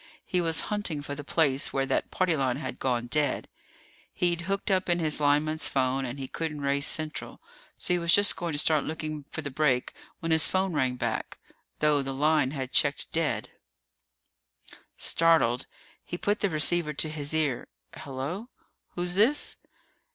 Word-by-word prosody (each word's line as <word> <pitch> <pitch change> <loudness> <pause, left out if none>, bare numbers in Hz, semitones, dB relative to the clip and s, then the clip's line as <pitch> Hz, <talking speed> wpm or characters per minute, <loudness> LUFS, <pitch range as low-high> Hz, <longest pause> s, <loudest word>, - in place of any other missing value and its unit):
He 180 - 0
was 165 -1 +1
hunting 175 -8 -2
for 145 - -5
the 145 +1 -6
place 145 -3 +2
where 135 0 0
that - - -1
party 185 -3 +1
line 130 -3 0
had 155 - -6
gone 120 -2 0
dead. 145 +4 0 0.6
He'd 175 -1 0
hooked 195 +1 -1
in 185 -2 +2
his 155 -3 +3
lineman's 150 +2 +2
phone 135 0 0
and 125 +2 -5
he 135 -1 -5
couldn't 155 -1 -4
raise 140 0 +2
Central, 155 -1 -1 0.4
so 180 - -1
he 180 - +1
was 170 0 +1
just 205 +1 +6
going 170 -3 -3
to - - -2
start 155 0 +3
looking 155 -2 -5
for 160 - -6
the 145 - -4
break 130 -3 +1 0.3
when 165 - -3
his 160 0 +6
phone 190 -1 0
rang 130 -4 +1
back, - - -3 0.4
though 150 -1 +3
the 135 0 -4
line 150 -1 +3
had 130 -2 -5
checked 140 -1 +1
dead. 165 -1 -1 1.5
Startled, 160 -7 +2 0.4
he 175 - -6
put 205 +3 0
the 200 - +1
receiver 155 0 +2
to 155 - +1
his 150 -2 -4
ear. 150 -6 0 0.3
"Hello. 145 - -5 0.5
Who's 175 0 -1
this?" 230 +10 +3
155 Hz, 170 wpm, -28 LUFS, 140-170 Hz, 1.5 s, just